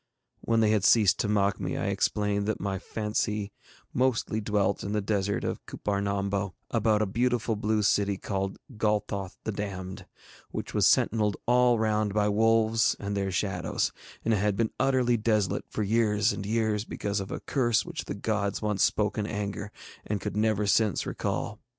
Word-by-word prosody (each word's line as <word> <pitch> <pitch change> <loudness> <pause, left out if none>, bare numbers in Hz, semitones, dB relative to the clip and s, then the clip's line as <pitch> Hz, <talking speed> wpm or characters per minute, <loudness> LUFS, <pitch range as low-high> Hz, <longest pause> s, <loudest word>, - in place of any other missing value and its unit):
When 115 -1 +1
they 110 -1 +4
had 105 -3 +2
ceased 105 -3 +5
to - - +1
mock 100 -1 +1
me, - - -3
I - - -1
explained 105 -1 0
that 110 - -1
my 95 -1 -2
fancy 105 -1 -2 0.4
mostly 120 -3 +1
dwelt 100 -2 0
in 100 - -3
the 105 - +1
desert 100 0 -1
of - - -3
Cuppar 100 -1 -2
Nombo, 100 -1 -1 0.2
about 110 -2 +2
a - - +1
beautiful 120 +1 0
blue 105 0 0
city 100 -1 +2
called 95 0 -3 0.2
Golthoth 100 -3 -1
the 110 - -2
Damned, 95 -2 -5 0.4
which - - -5
was - - +4
sentinelled 105 -3 +3
all 125 0 +4
round 105 -2 0
by 105 -1 +3
wolves 115 +1 +3
and 100 0 -3
their 100 -1 -1
shadows, 95 +1 -1 0.3
and 115 - +3
had 105 -1 +1
been 110 +1 0
utterly 125 -3 +3
desolate 105 -3 0
for 110 - -2
years 105 +1 +2
and 100 - -5
years 110 -1 +1
because 100 -2 -3
of 95 - -5
a - - -4
curse 120 -5 +1
which 175 -2 -6
the - - -4
gods 100 -1 -1
once 105 -2 0
spoke 105 +1 +1
in 105 - -1
anger 105 0 -4 0.3
and 105 -1 -2
could - - -4
never 105 -1 +1
since 105 -1 +2
recall. - - -3
105 Hz, 175 wpm, -28 LUFS, 100-110 Hz, 0.4 s, ceased